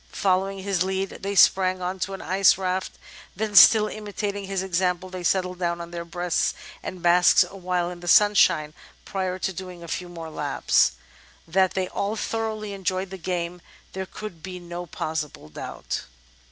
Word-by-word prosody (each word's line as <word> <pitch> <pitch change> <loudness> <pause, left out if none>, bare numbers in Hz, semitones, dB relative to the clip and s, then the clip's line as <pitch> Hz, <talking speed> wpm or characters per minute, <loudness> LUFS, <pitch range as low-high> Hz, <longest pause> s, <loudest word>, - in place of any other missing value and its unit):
Following 195 0 0
his 195 -3 -1
lead 190 +1 0
they 200 +1 -3
sprang 185 0 +5
on 185 +1 -3
to 195 +2 -2
an - - -9
ice 190 0 +4
raft; 185 0 -2 0.4
then, 215 +2 -3
still 215 +1 +9
imitating 205 -1 -4
his 190 -1 -2
example, 185 0 -1
they 185 -1 -6
settled 180 0 0
down 170 -1 -1
on 170 0 -7
their 170 -1 -5
breasts 175 0 -1 0.3
and 180 -2 -7
basked 175 +1 +6
awhile 180 -2 -2
in 175 - -9
the 175 - -10
sunshine 195 -7 +5 0.2
— - - -30
prior 185 -1 -2
to 190 +1 -2
doing 180 -1 -8
a - - -9
few 180 +2 -4
more 165 -2 -8
laps. 60 - +2 0.5
That 185 +2 +2
they 190 -1 0
all 200 +4 -2
thoroughly 220 -2 -3
enjoyed 190 -1 -2
the 190 - -7
game, 175 0 -3 0.3
there 190 0 -4
could 195 -5 -8
be 185 +1 -7
no 175 0 -7
possible 150 - -4
doubt." 75 - -5
185 Hz, 175 wpm, -25 LUFS, 175-195 Hz, 0.5 s, still